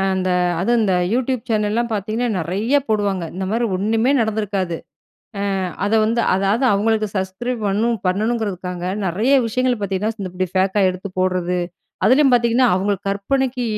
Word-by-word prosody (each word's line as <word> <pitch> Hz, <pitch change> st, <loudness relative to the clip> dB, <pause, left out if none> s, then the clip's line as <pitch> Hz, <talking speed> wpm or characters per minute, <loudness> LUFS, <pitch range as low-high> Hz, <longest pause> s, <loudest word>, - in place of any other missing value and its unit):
அந்த 185 Hz, -1 st, -1 dB, 0.3 s
அதும் 235 Hz, +6 st, +2 dB
அந்த 195 Hz, -4 st, +2 dB, 0.2 s
யூடியூப் 255 Hz, -1 st, -1 dB
சேனல்லாம் 220 Hz, +2 st, 0 dB
பாத்தீங்கன்னா, 215 Hz, +4 st, -2 dB
நெறையா 200 Hz, -, +1 dB
போடுவாங்க. 200 Hz, -5 st, 0 dB
இந்த 190 Hz, +1 st, -3 dB
மாரி 235 Hz, +2 st, +1 dB
ஒண்ணுமே 220 Hz, +6 st, +1 dB
நடந்துருக்காது. 205 Hz, -5 st, -1 dB, 0.9 s
அ -, -, -1 dB, 0.2 s
அத 210 Hz, -, -2 dB
வந்து 230 Hz, +2 st, +1 dB
அதாது 200 Hz, +6 st, +1 dB
அவுங்களுக்கு 215 Hz, +1 st, +1 dB
சஸ்கிரைப் 190 Hz, +6 st, -3 dB
வரனும், 225 Hz, +4 st, +1 dB
பண்ணணுங்குறதுக்காக, 190 Hz, -3 st, -2 dB, 0.2 s
நெறைய 215 Hz, +10 st, +2 dB
விஷயங்கள் 250 Hz, 0 st, 0 dB
பாத்தீங்கன்னா, 200 Hz, +3 st, -1 dB
இந்த 185 Hz, -, -4 dB
இப்டி 185 Hz, 0 st, -1 dB
ஃபேக்கா 190 Hz, +2 st, +2 dB
எடுத்து 185 Hz, +2 st, -7 dB
போட்றது, 180 Hz, -1 st, 0 dB, 0.5 s
அதுலயும் 265 Hz, +3 st, +5 dB
பாத்தீங்கன்னா, 240 Hz, +1 st, +3 dB
அவுங்களு 195 Hz, +1 st, 0 dB
கற்பனைக்கு 250 Hz, +5 st, -1 dB
210 Hz, 140 wpm, -20 LUFS, 190-235 Hz, 0.9 s, அதுலயும்